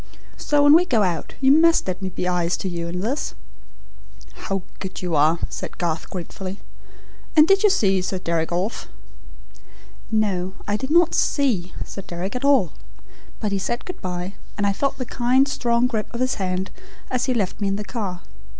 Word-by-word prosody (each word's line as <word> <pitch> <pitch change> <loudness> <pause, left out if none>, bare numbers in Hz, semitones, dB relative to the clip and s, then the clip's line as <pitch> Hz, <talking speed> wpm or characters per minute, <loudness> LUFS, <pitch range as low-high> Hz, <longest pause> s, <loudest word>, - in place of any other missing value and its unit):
So 290 -1 +2
when 290 0 +8
we 335 +3 +7
go 235 - +2
out 175 -3 -2
you 265 0 +5
must 330 -1 +5
let 185 +1 -3
me 190 - -2
be 180 0 -3
eyes 175 -1 +1
to - - -4
you 170 -2 -3
in 180 +1 -3
this." 255 +9 -2 1.0
"How 195 -2 -4 0.2
good 190 -1 -6
you 175 -3 -1
are!" 155 +3 +4
said - - -7
Garth, 165 -2 -2
gratefully. 185 +2 -6 0.8
"And 305 0 +7
did 390 0 +5
you 420 - +6
see 195 - +3
Sir 185 +1 -2
Deryck 170 -2 -1
off?" 185 +6 -2 1.2
"No. 195 -4 0
I 205 - +1
did 265 +5 -3
not 340 +1 +4
SEE 220 - +1
Sir 195 - -7
Deryck 185 +3 -5
at 250 - -3
all. 270 - +4 0.7
But 210 - -2
he 200 - 0
said 235 +5 -3
good 365 - -7
bye, 180 +1 -4 0.2
and 205 - 0
I 200 - +2
felt 275 +7 -1
the 255 - -3
kind, 255 +3 +2
strong 240 -3 +1
grip 225 -4 -2
of - - -3
his 255 0 +1
hand 185 0 -2 0.4
as 255 -1 +1
he 255 - 0
left 205 -2 -1
me 200 - +1
in 195 - 0
the 210 - -4
car. 200 -7 -4
200 Hz, 195 wpm, -23 LUFS, 180-255 Hz, 1.2 s, when